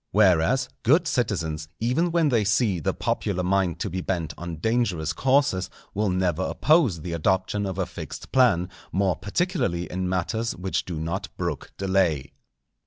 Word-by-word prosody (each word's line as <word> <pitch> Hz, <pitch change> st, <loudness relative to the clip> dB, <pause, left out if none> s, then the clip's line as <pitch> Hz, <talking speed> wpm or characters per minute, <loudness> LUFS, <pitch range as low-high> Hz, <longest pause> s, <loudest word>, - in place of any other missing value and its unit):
Whereas, 105 Hz, +6 st, +3 dB
good 160 Hz, +8 st, +4 dB
citizens, 85 Hz, -, -1 dB
even 130 Hz, +10 st, +1 dB
when 165 Hz, -3 st, +3 dB
they 115 Hz, -5 st, +2 dB
see 100 Hz, -2 st, +2 dB
the 75 Hz, -, 0 dB
popular 90 Hz, -3 st, -1 dB
mind 95 Hz, -2 st, +1 dB
to -, -, -1 dB
be 95 Hz, +1 st, -2 dB
bent 85 Hz, -4 st, -2 dB
on 85 Hz, 0 st, -6 dB
dangerous 90 Hz, -5 st, 0 dB
courses, 130 Hz, -, +2 dB, 0.2 s
will 105 Hz, 0 st, 0 dB
never 90 Hz, -2 st, 0 dB
oppose 130 Hz, -, +2 dB
the 85 Hz, 0 st, -4 dB
adoption 95 Hz, +4 st, 0 dB
of 95 Hz, -1 st, -4 dB
a 95 Hz, -, 0 dB
fixed -, -, -8 dB
plan, 105 Hz, -9 st, +4 dB, 0.2 s
more 95 Hz, -1 st, +1 dB
particularly 120 Hz, -, -1 dB
in 90 Hz, 0 st, -2 dB
matters 110 Hz, +6 st, -1 dB
which 95 Hz, +1 st, -2 dB
do 85 Hz, -4 st, -4 dB
not 85 Hz, +5 st, -3 dB
brook 85 Hz, -6 st, -3 dB
delay. 90 Hz, -8 st, +1 dB
95 Hz, 160 wpm, -25 LUFS, 85-115 Hz, 0.2 s, good